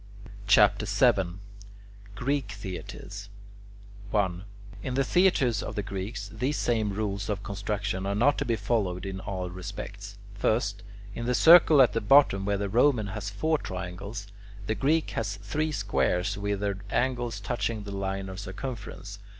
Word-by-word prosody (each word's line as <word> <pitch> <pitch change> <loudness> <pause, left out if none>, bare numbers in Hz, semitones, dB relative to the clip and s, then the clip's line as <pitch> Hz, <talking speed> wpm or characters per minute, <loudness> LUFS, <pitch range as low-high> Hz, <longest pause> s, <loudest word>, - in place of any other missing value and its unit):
CHAPTER - - +5
VII 90 -2 +3 0.8
GREEK 140 +5 -1
THEATRES 100 0 -7 0.8
1. 95 -3 0 0.4
In 125 +4 -3
the 135 - +3
theatres 135 - +3
of - - -5
the 105 - -2
Greeks, 100 +2 -5
these 135 +3 -1
same 110 -3 +1
rules 100 0 -3
of 100 -1 -2
construction 100 -1 -3
are 100 - 0
not 135 +7 +3
to - - +1
be 115 - +1
followed 100 -6 -1
in 95 -1 -4
all 90 -2 -4
respects. 100 +2 -7 0.2
First, 105 0 0 0.3
in 120 +3 -4
the 125 - +2
circle 160 -3 +8
at 125 - +2
the 115 - 0
bottom 105 -5 +5
where 100 0 +1
the 100 0 -2
Roman 120 +2 +3
has 105 -2 -4
four 155 +10 0
triangles, 95 +3 -6 0.4
the 110 - 0
Greek 145 +9 +1
has 110 -2 -2
three 145 +11 -2
squares 100 -8 0
with 100 0 -2
their 100 -1 -1
angles 120 -3 -1
touching 110 +1 -2
the 100 - -7
line 95 0 -3
of 95 0 -7
circumference. 100 -1 -7
105 Hz, 155 wpm, -28 LUFS, 100-120 Hz, 0.8 s, circle